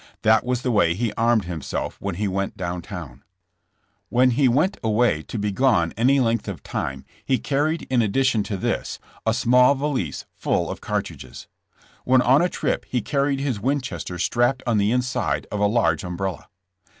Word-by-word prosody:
That 110 +1 +4
was 125 0 -2
the 125 - 0
way 85 -6 +3
he 110 +1 -1
armed 115 -3 +2
himself 85 -5 -4
when 100 -3 -3
he 105 +3 -1
went 95 +1 -2
down 90 -1 -3
towTi. 80 - -9 0.9
When 125 +1 +4
he 130 +2 +3
went 155 +11 +2
away 110 -6 +2
to 110 - -7
be 105 0 -1
gone 95 -7 +2
any 130 +5 +3
length 115 -2 0
of - - -6
time 70 0 -4 0.2
he 130 - +1
car 140 +2 0
ried 160 +1 -1
in 125 -2 +1
addition 115 +1 +2
to 100 -1 -3
this, - - -2 0.3
a 110 - +4
small 125 +4 +4
valise 135 - -2
full - - -1
of - - -7
cartridges. - - -5 0.6
When 130 0 +4
on 135 +5 +5
a 180 - +2
trip - - -2
h© 125 -4 -1
carried 140 -1 0
his 135 -7 -1
Winches 130 +3 -2
ter 90 - -6
strapped 120 +8 +1
on 115 -4 +2
the 100 +2 +2
inside 125 0 -1
of 105 - -2
a 105 - +3
large 100 -8 +1
umbrella. 90 +1 -4
115 Hz, 185 wpm, -23 LUFS, 100-130 Hz, 0.9 s, on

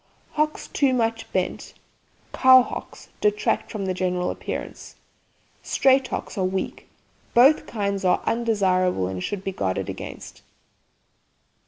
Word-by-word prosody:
Hocks 305 0 -1
too 270 -3 +1
much 225 -1 -1
bent - - -3 0.6
(cow 260 -1 +7
hocks) - - -8
detract 210 0 +1
from 210 -3 -4
the 185 - -1
general 180 -1 -1
appearance. - - -7 0.7
Straight 265 -1 +3
hocks 210 - -5
are - - +1
weak. 190 +1 -3 0.5
Both 270 +6 +5
kinds 200 -3 -2
are 180 - +2
undesirable, 185 - +1
and 90 -1 -4
should 200 -2 -4
be 195 - -2
guarded 95 - -2
against. - - -8
205 Hz, 125 wpm, -24 LUFS, 185-245 Hz, 0.7 s, cow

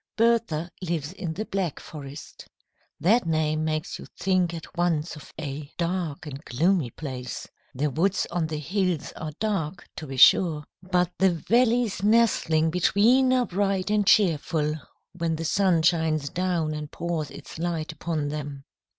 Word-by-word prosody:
Bertha 225 -8 +2
lives 165 -3 -3
in 175 -4 -4
the 215 +6 -4
Black 190 -7 -2
Forest. 145 -1 -10 0.5
That 205 +2 +3
name 155 -1 +1
makes 155 +1 -2
you - - -10
think 185 -2 +2
at 165 -1 -9
once 170 -2 0
of 150 - -12
a 145 0 -5
dark 170 -4 -2
and 145 0 -7
gloomy 160 +2 +1
place. 125 -2 -6 0.3
The 145 +3 0
woods 180 +8 +1
on 170 -2 0
the 155 -1 -3
hills 180 +1 -1
are 155 - -5
dark, 190 -6 -2
to 155 - -6
be 135 -1 -6
sure, 150 +3 +6 0.2
but 180 -1 +1
the 190 +1 +5
valleys 230 +4 +2
nestling 200 -8 +3
between 230 +9 +4
are 255 -1 +3
bright 195 0 0
and 210 -2 +2
cheerful 160 -6 +3 0.4
when 165 -1 -1
the 165 +1 -4
sun 180 -2 +2
shines 160 -3 +2
down 175 -4 -1
and 150 -1 -5
pours 165 -3 -3
its 145 +1 -10
light 165 -2 -2
upon 160 -2 -3
them. 145 -2 -5
165 Hz, 155 wpm, -26 LUFS, 155-190 Hz, 0.5 s, sure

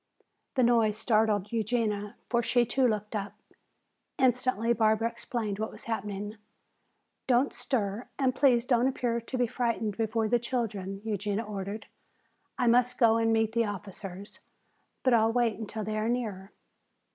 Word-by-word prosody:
The 255 - +3
noise 230 -3 +3
startled 215 -3 +2
Eugenia, 215 -2 -1
for 235 -1 +2
she 240 +1 +2
too 255 +2 +2
looked 210 -1 -2
up. 200 -1 -3 0.8
Instantly 250 -3 +2
Barbara 220 0 +2
explained 215 -4 -4
what 220 - -2
was - - -11
happening. 210 -1 -4 0.9
"Don't 255 +2 +3
stir 240 -3 -2
and 265 -2 +2
please 255 -3 +3
don't 245 -1 +3
appear 240 -3 -1
to 255 +3 -5
be 245 - +3
frightened 230 -3 -1
before 225 0 0
the 240 +2 +2
children," 210 -6 -3
Eugenia 210 0 -1
ordered. 205 0 -5 0.7
"I 245 - +1
must 245 +1 +3
go 225 -2 +5
and 225 0 +2
meet 225 -1 +2
the 230 0 +1
officers, 200 -1 -7 0.6
but 255 - +4
I'll 225 -1 +4
wait 230 -2 +1
until 215 0 -5
they 215 +1 -2
are 220 +2 0
nearer." 215 -6 -3
225 Hz, 150 wpm, -29 LUFS, 210-240 Hz, 0.9 s, go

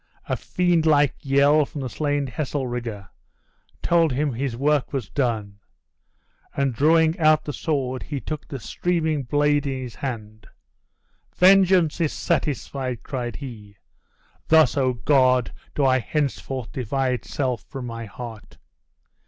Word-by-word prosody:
A - - 0
fiend 175 -3 +1
like 145 -3 +4
yell 140 +2 +4
from 145 0 -7
the 130 - -3
slain 145 +2 -1
Heselrigge 125 -6 -4 0.8
told 170 -3 +3
him 145 +1 0
his 125 0 -3
work 145 +1 +1
was 130 -7 -3
done; 110 -7 -2 1.0
and 140 -2 +1
drawing 160 +5 +3
out 155 -1 +4
the 145 - -4
sword 130 -5 -2
he 145 -3 -4
took 155 +2 -6
the 135 - -6
streaming 160 +4 -1
blade 145 +2 +1
in 130 -1 -3
his 120 -3 -7
hand. 110 -5 -6 0.9
"Vengeance 185 -3 +5
is 155 - +1
satisfied," 135 -6 -2
cried 125 -4 -4
he; 105 -7 -9 0.7
"thus, 160 -4 +5
O 130 -3 +2
God! 130 -1 +2 0.2
do 140 - +2
I 130 -1 +4
henceforth 135 -2 -3
divide 130 0 -1
self 130 -5 -2
from 135 -2 -6
my 115 -1 -6
heart!" 110 0 -10
135 Hz, 135 wpm, -23 LUFS, 125-150 Hz, 1.0 s, Vengeance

